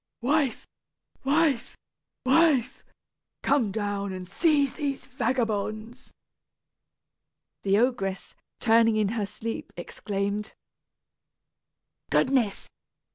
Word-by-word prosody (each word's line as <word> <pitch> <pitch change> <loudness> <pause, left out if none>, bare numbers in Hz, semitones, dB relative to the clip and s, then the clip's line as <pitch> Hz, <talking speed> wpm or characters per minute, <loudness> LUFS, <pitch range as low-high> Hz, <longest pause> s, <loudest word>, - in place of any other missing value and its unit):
"Wife, 275 -1 +1 0.6
wife, 280 -3 +1 0.5
wife, 270 -3 +3 0.6
come 260 -8 +2
down 205 -1 -2
and 185 -1 -6
seize 285 - +2
these 280 -4 -3
vagabonds!" 230 -2 -2 1.5
The 195 0 +2
ogress, 210 -5 0 0.3
turning 225 -1 +4
in 215 -2 +2
her 215 -2 -2
sleep, 225 +3 -6
exclaimed, 200 +3 -3 1.6
"Goodness! 250 -7 +1
230 Hz, 80 wpm, -27 LUFS, 205-270 Hz, 1.6 s, turning